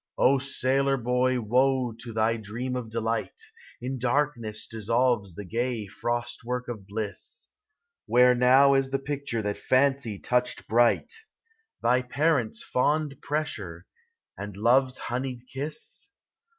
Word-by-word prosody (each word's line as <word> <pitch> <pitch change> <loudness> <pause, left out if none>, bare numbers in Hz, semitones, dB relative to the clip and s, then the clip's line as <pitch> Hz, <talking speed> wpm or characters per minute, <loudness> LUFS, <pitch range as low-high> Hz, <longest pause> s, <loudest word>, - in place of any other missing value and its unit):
O 135 +1 +4
sailor 135 0 +1
boy, 125 +1 +1
woe 125 +2 +2
to 115 +1 -8
thy 110 +1 +1
dream 115 +4 -4
of 125 -3 -4
delight! 115 - -2 0.4
In 130 +2 -4
darkness 120 -5 0
dissolves 115 -3 0
the 100 - -7
gay 115 +2 -2
frost 120 +5 -3
work 125 +1 -3
of 110 -5 -7
bliss. 105 0 -3 0.6
Where 125 +1 +6
now 130 +3 +6
is 135 -1 +2
the 135 - 0
picture 135 -5 -3
that 105 0 -2
Fancy 130 -4 +2
touched 125 +4 -1
bright, 120 - +3 0.4
— 450 0 -40
Thy 125 +2 +4
parents' 130 -3 0
fond 145 +2 0
pressure, 155 +2 -3 0.5
and 100 -1 -7
love's 125 +4 +3
honeyed 125 0 -4
kiss? 140 +4 -2
125 Hz, 130 wpm, -27 LUFS, 115-135 Hz, 0.6 s, Where